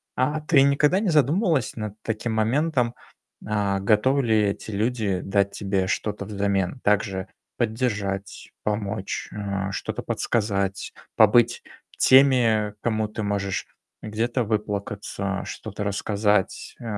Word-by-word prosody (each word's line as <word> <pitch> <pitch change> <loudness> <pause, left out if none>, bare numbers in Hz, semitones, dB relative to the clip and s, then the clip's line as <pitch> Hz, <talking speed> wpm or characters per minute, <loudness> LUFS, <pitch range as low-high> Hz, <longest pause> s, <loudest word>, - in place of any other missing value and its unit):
А 150 +4 0
ты 150 -3 +4
никогда 145 +6 +3
не 205 -2 0
задумывалась 155 - +2
над 105 -3 -5
таким 115 +1 -3
моментом: 120 +2 +1 0.5
а 100 -2 0
готовы 110 +8 +3
ли 110 -2 +3
эти 100 +2 -3
люди 105 -3 -1
дать 100 0 +1
тебе 95 -2 -1
что-то 100 +1 -2
взамен? 100 +1 -1
Также 100 -2 +1 0.3
поддержать, 105 -4 -2
помочь, 105 -2 -3
э, 100 -1 -3
что-то 100 - -4
подсказать, 100 -4 -1 0.2
побыть 115 +2 +5 0.4
теми, 120 -6 +5
кому 110 -2 0
ты 110 +1 -6
можешь 100 -2 -2 0.4
где-то 115 +4 -1
выплакаться, 100 -2 -3
что-то 105 -1 -6
рассказать, 105 0 0
э, - - -11
105 Hz, 115 wpm, -24 LUFS, 100-120 Hz, 0.5 s, побыть